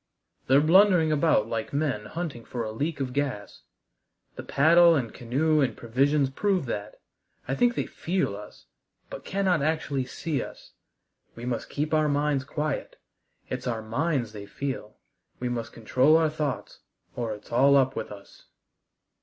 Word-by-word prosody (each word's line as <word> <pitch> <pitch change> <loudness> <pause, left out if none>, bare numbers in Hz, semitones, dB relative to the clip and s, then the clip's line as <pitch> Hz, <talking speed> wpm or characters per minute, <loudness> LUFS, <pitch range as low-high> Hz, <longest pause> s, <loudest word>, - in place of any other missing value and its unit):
"They're 135 +2 +5
blundering 175 0 +5
about 150 -7 +3
like 115 +2 -4
men 140 -8 -1
hunting 155 -7 -5
for 120 0 -4
a 110 - -4
leak 145 +7 -3
of 130 -2 -3
gas. 135 -7 -3 0.7
The - - -6
paddle 170 +4 +5
and 125 -6 -2
canoe 150 +6 +1
and 135 - 0
provisions 135 +4 +1
prove 190 +2 0
that. 105 -3 -5 0.5
I 135 - -1
think 240 - +2
they - - -1
feel 175 - -2
us, 105 - -12 0.5
but - - -7
cannot 190 -5 +1
actually 145 -3 -1
see 145 +3 -3
us. - - -10 0.6
We 120 - -8
must 125 -2 -3
keep 150 +2 -2
our 155 -1 +3
minds 145 -1 +1
quiet 150 0 -3 0.5
it's 125 0 -4
our 115 -2 -2
minds 125 0 -1
they 100 -1 -8
feel. 130 -3 -5 0.4
We 125 - -2
must 120 -2 -4
control 130 +7 +3
our 160 -1 +2
thoughts, 150 -3 -4 0.4
or 115 -3 -2
it's 105 - -16
all 140 +4 +5
up 130 -1 +2
with 110 - -5
us." 100 -1 -13
140 Hz, 160 wpm, -27 LUFS, 120-155 Hz, 0.7 s, They're